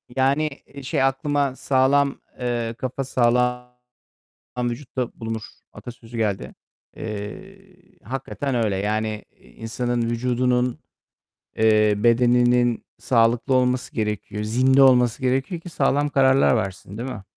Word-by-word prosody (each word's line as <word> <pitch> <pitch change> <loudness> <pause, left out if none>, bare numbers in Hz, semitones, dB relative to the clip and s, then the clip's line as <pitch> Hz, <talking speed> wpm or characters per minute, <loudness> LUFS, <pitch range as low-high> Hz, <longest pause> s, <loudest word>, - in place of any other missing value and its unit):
Yani, 140 +4 +2 0.2
eee, 140 -1 -12
şey, 130 - 0
aklıma, 140 0 0
"Sağlam, 140 +1 +2 0.2
eee, 120 -2 -2
kafa 130 +1 -3
sağlam 125 0 +1 0.9
vücutta 125 0 -3
bulunur." 115 -1 -4 0.3
atasözü 120 -1 -10
geldi. 105 -4 -2 0.4
Eee, 185 - -9
hakikaten 135 +1 -4
öyle. 110 -5 0
Yani, 105 +1 -2
eee, - - -21
insanın 120 - -3
vücudunun, 125 +1 0 0.8
eee, 110 -1 +4
bedeninin 120 +1 +3
sağlıklı 120 +2 +2
olması 125 0 +1
gerekiyor. 105 -1 -3
Zinde 130 +5 +4
olması 125 -2 +4
gerekiyor 135 +7 -1
ki 175 - -9
sağlam 145 0 +1
kararlar 135 -2 +4
versin, 95 0 -4
değil 125 +3 -4
mi? 100 -5 -7
125 Hz, 115 wpm, -23 LUFS, 115-135 Hz, 0.9 s, eee